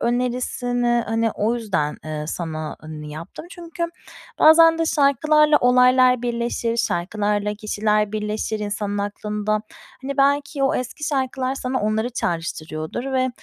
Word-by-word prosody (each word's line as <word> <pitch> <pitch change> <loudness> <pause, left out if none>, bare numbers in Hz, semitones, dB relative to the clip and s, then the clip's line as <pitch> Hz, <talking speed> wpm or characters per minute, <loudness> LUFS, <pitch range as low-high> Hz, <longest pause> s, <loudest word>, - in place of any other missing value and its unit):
önerisini, 245 0 0
hani, 225 0 +1
o 220 +3 0
yüzden, 190 -11 -1
ııı, 155 -1 -4
sana 155 -3 -4 0.3
yaptım 155 - -9
çünkü 340 -1 -5 0.5
bazen 325 +1 +7
de 330 - +1
şarkılarla 300 +1 +4
olaylar 250 0 +5
birleşir, 235 -1 -1
şarkılarla 210 0 -1
kişiler 210 0 0
birleşir 215 0 -2
insanın 205 -1 -3
aklında. 210 +1 -2 0.4
Hani, 275 +1 -4
belki 285 0 +1
o 270 - +2
eski 260 +4 -4
şarkılar 265 -2 -1
sana 260 -1 -2
onları 220 +3 0
çağrıştırıyordur 165 +4 -4
ve 255 0 +2
235 Hz, 120 wpm, -22 LUFS, 210-260 Hz, 0.5 s, bazen